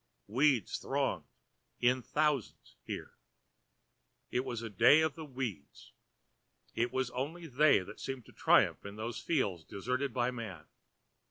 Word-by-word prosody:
Weeds 125 0 +2
thronged, - - -1 0.5
in 125 +1 +3
thousands 150 -2 -1
here. - - -5 1.2
It 125 - +1
was 120 -4 -4
the 115 - -5
day 120 +10 +6
of 160 -2 +1
the 160 - -8
weeds. 125 - -6 0.8
It 120 +1 0
was 130 -2 -1
only 155 +8 -4
they 145 -4 +4
that 105 +3 -10
seemed 135 -4 -5
to - - -15
triumph - - +4
in 100 0 -8
those 110 +2 -4
fields 100 - 0
deserted 125 - -3
of 125 +1 +1
man. 100 -10 -7
125 Hz, 140 wpm, -33 LUFS, 110-140 Hz, 1.2 s, day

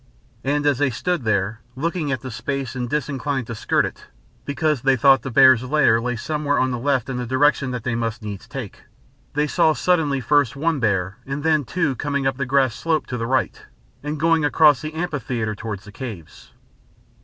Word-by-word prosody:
And 145 +2 0
as 145 -3 +2
they 145 -2 +2
stood 170 +2 -2
there, 105 +1 0
looking 160 +1 -2
at 130 -4 -2
the 130 - -7
space, 130 +2 -4
and 125 -2 -3
disinclined 140 -2 -2
to 115 - -6
skirt 110 - +1
it, - - -8 0.4
because 145 -1 0
they 135 +1 +3
thought 135 +1 +5
the 135 - -5
bears' 130 0 +6
lair 130 -4 +3
lay 125 +1 -2
somewhere 150 +3 -1
on 130 0 +1
the 125 - -3
left 135 -1 0
in 130 -2 -4
the 125 - -3
direction 135 +1 +2
they 120 -1 -3
must 115 -1 -3
needs 105 0 -7
take, 130 -5 -8 0.5
they 150 0 +2
saw 155 +1 +3
suddenly 160 -6 +1
first 145 0 +2
one 160 +1 0
bear 100 -4 0
and 140 +2 -4
then 155 -3 +2
two 150 +1 -1
coming 140 +1 -2
up 135 -1 0
the 140 -2 -2
grass 130 -3 +2
slope 160 +3 -1
to 125 - -4
the 115 - -2
right 130 +1 -1 0.4
and 150 +1 -4
going 165 0 +3
across 145 -1 +4
the 155 0 -6
amphitheatre 130 -10 -2
towards 105 -2 -6
the 105 - -12
caves. 105 - -9
135 Hz, 200 wpm, -22 LUFS, 120-145 Hz, 0.5 s, bears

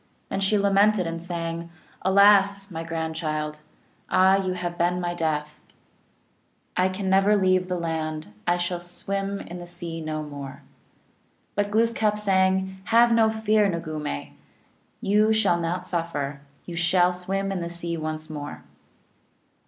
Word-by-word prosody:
Then - - -2
she 200 +2 +3
lamented 200 0 +3
and 165 0 -4
sang 170 -1 -4 0.2
" - - -29
Alas, 200 +1 +5
my 165 -1 -4
grandchild 160 -2 -3
(noojeech), 150 - -34
Ah, 190 +1 +5
you 185 -1 -1
have 175 -1 -4
been 175 +1 +1
my 175 -1 -2
death; 155 -3 -1 1.3
I 185 +1 +3
can 190 +1 -4
never 195 +2 +4
leave 185 -1 +2
the 180 -1 -1
land, 155 -7 -3
I 175 0 +3
shall 175 0 -2
swim 195 +3 -3
in 175 +1 -8
the 175 - -9
sea 170 -1 -6
no 155 -1 -3
more." 140 -2 -8 0.9
But 205 0 0
Glooskap 220 -1 +2
sang: 190 -1 +1
"Have 235 +3 +5
no 225 -1 +5
fear, 215 -1 +2
noogumee, 155 - -4 0.7
You 210 +2 +3
shall 200 -6 +3
not 175 +2 -2
suffer, 150 -5 -3 0.2
You 175 - -7
shall 180 +1 +3
swim 195 +2 -2
in 190 -2 -2
the 170 - -3
sea 170 0 -4
once 155 -1 -4
more." 150 -2 -7
180 Hz, 150 wpm, -25 LUFS, 165-195 Hz, 1.3 s, Alas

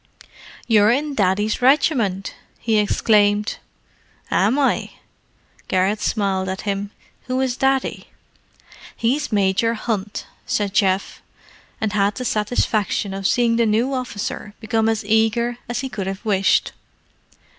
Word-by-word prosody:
"You're 215 -3 +4
in 285 +5 +1
Daddy's 210 +1 +1
regiment!" 245 - +2 0.2
he 220 -2 +1
exclaimed. 210 0 +2 0.7
"Am 215 +8 +2
I?" 280 -2 0 0.7
Garrett 195 +3 +1
smiled 195 -3 0
at 190 +1 -4
him. 200 0 -3 0.4
"Who 255 0 -1
is 260 -2 0
Daddy?" 270 0 0 0.9
"He's 270 +5 0
Major 205 +3 +2
Hunt," 215 -3 -3 0.2
said 205 -2 -1
Geoff; 195 -2 +1 0.6
and 215 -1 -1
had 200 0 +1
the 250 - -5
satisfaction 210 -2 0
of 195 0 -1
seeing 235 -1 +2
the 235 -1 +3
new 230 +6 +1
officer 210 -4 -4
become 225 0 0
as 220 -2 -1
eager 225 +3 +1
as 240 0 -2
he 270 - -3
could 200 -7 -5
have 195 +3 -5
wished. 195 -2 +2
215 Hz, 125 wpm, -21 LUFS, 200-240 Hz, 0.9 s, You're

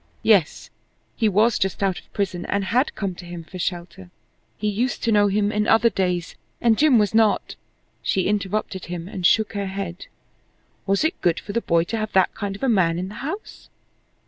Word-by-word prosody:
Yes! 200 -8 +2 0.4
he 220 -3 +2
was 215 +4 +3
just 190 +1 -1
out 190 -2 0
of - - -23
prison 185 -3 -2
and 200 0 0
had 250 +8 +1
come 195 -3 -3
to 180 - -11
him 175 -1 -8
for 185 +3 -10
shelter. 180 +1 -5 0.5
He 210 - -2
used 235 +5 -1
to 230 - +2
know 205 -1 +4
him 205 +1 +1
in 210 0 0
other 225 +1 +4
days, 180 -3 -1 0.3
and 230 -2 +3
Jim 285 -1 +4
was 210 -2 +2
not 220 -1 +2 0.5
She 190 - 0
interrupted 200 -1 -2
him 175 0 -6
and 185 -3 +1
shook 220 -1 +2
her 200 -1 -2
head. 190 -2 -6 0.8
Was 195 +6 +2
it 315 - -1
good 170 -1 +2
for 205 - -8
the 235 - 0
boy 165 -5 +2
to 225 +6 -4
have 215 -1 -3
that 190 -1 +3
kind 200 -1 -4
of 200 - -10
a - - +2
man 180 -8 +2
in 185 +2 -3
the - - -9
house? 375 +11 -7
200 Hz, 205 wpm, -23 LUFS, 180-220 Hz, 0.8 s, know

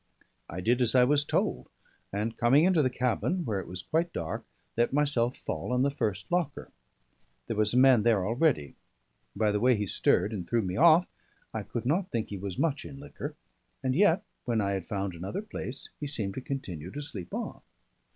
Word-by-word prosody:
I 90 +3 -5
did 120 +6 +2
as 120 0 +3
I 125 - +7
was 145 +3 +3
told, 65 - -1 0.4
and 105 +3 -2
coming 130 +6 +4
into 180 -3 +4
the 130 - +2
cabin, 130 +8 0
where 105 -5 -1
it 95 - -7
was 90 0 -6
quite 165 - 0
dark, 80 - -4 0.3
let 120 +1 +2
myself 135 -4 +2
fall - - -4
on 125 +1 +2
the 140 - +2
first 110 - -3
locker. 175 -5 -1 0.7
There 115 - -3
was 105 +2 +1
a - - +4
man 130 -3 +7
there 105 -4 +3
already: 120 - +1 0.6
by 110 -1 +2
the 105 - 0
way 125 +2 +4
he 105 -1 -1
stirred 100 +3 +2
and 90 -5 -5
threw 115 -2 +2
me 90 -1 -3
off, 170 +3 +6 0.5
I - - -2
could 120 - -5
not 175 +8 +1
think 115 -2 -2
he 100 - -4
was 95 -1 -5
much 155 -3 0
in 135 - -9
liquor; 145 +1 -7 0.5
and 130 -1 +1
yet 185 +3 +4 0.2
when 115 -2 +1
I 100 -1 0
had 95 -3 -3
found 100 -2 -2
another 95 - -5
place, 140 - -6
he 145 - -3
seemed 110 -9 -2
to 130 - -5
continue 90 - -5
to 145 +9 -6
sleep 95 -11 -6
on. - - -5
120 Hz, 205 wpm, -29 LUFS, 100-145 Hz, 0.7 s, I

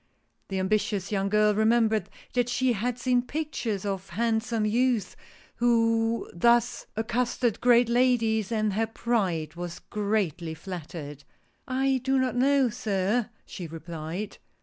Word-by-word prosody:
The 195 - -3
ambitious 200 0 0
young 195 -1 0
girl 210 0 +4
remembered 220 -2 +2 0.2
that 245 -1 +1
she 250 0 +2
had 235 +3 -2
seen 250 0 +2
pictures 250 -8 -3
of 195 -1 -3
hand 220 +4 +1
some 225 -2 -1
youths 230 -2 +1 0.4
who 230 -1 +2
thus 235 +6 +2
accosted 235 +1 0
great 245 -1 +5
ladies, 235 -4 +2
and 215 -2 +1
her 225 +3 0
pride 190 -10 -1
was 175 0 -6
greatly 195 -6 -2
flattered. 155 -4 -7 0.3
" - - -43 0.2
I 270 -1 +2
do 270 +1 +2
not 260 -1 +1
know, 270 0 +3
sir," 210 +2 0 0.2
she 175 -4 -7
replied. 165 +4 -6
220 Hz, 135 wpm, -27 LUFS, 195-240 Hz, 0.4 s, great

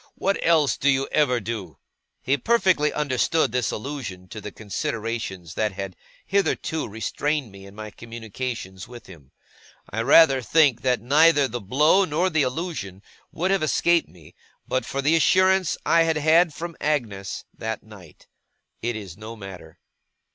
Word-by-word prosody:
What 195 +1 0
else 155 -6 +3
do 140 - +2
you 135 0 +2
ever 135 -5 +2
do?' 100 - -6 0.5
He 135 - +2
perfectly 185 - +2
understood 150 0 +1
this 125 -2 0
allusion 110 -8 -6
to 110 - -8
the 105 - -7
considerations 105 -4 -4
that 105 +1 -1
had 95 -1 -6 0.3
hitherto 190 -5 0
restrained 130 +4 -2
me 100 0 -12
in 100 - -14
my 110 0 -8
communications 115 -4 -7
with 120 -1 -12
him. 75 -8 -15 0.6
I 110 - -2
rather 135 +1 +6
think 140 -1 +3
that 125 -4 +1
neither 145 +3 +4
the 120 -1 -5
blow, 150 - +3
nor 180 +2 0
the 160 -2 +2
allusion, 130 - -4 0.3
would 185 +4 -1
have 195 - +2
escaped 170 +2 +2
me, 80 -4 -17 0.3
but 130 - -1
for 140 0 -3
the 155 +4 +4
assurance 185 +2 +3
I 165 - +4
had 165 -1 +2
had 160 +3 +4
from 170 +3 -7
Agnes 110 -11 -2
that 110 -1 -5
night. 100 -7 -15 0.6
It 120 +1 -2
is 100 -6 -8
no 110 +2 -8
matter. 95 -6 -11
125 Hz, 155 wpm, -24 LUFS, 105-155 Hz, 0.6 s, rather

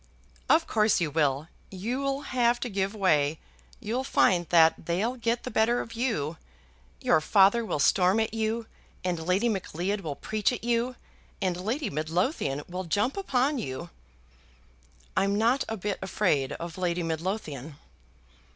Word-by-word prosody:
"Of 325 +1 +5
course 215 -1 +2
you 165 -4 -1
will. 145 -1 +1 0.2
You'll 260 +8 -2
have 240 -2 +1
to 245 - -2
give 195 0 -1
way. 155 -7 +2 0.4
You'll 240 +5 -2
find 180 -9 +3
that 165 -2 +4
they'll 205 +9 0
get 235 -1 -1
the - - -5
better 225 +3 +2
of 230 - -6
you. 210 - -1 0.6
Your 155 - +3
father 200 +7 +4
will 220 - -2
storm 185 +7 +3
at 220 -1 -1
you, 225 +1 -1 0.4
and 180 -2 -1
Lady 185 +7 +2
Macleod 195 -1 -2
will 150 -6 -4
preach 215 - 0
at 245 - -5
you, 240 +1 0 0.4
and 185 -2 0
Lady 220 - -2
Midlothian 155 - -1
will 185 +1 -5
jump 205 +9 0
upon 280 -7 +1
you." 130 - -5 1.2
"I'm 200 +1 +2
not 235 +5 +2
a 225 - -3
bit 205 0 -3
afraid 175 -8 0
of 170 +1 -7
Lady 175 -1 0
Midlothian." 160 - -4
200 Hz, 150 wpm, -27 LUFS, 170-235 Hz, 1.2 s, Of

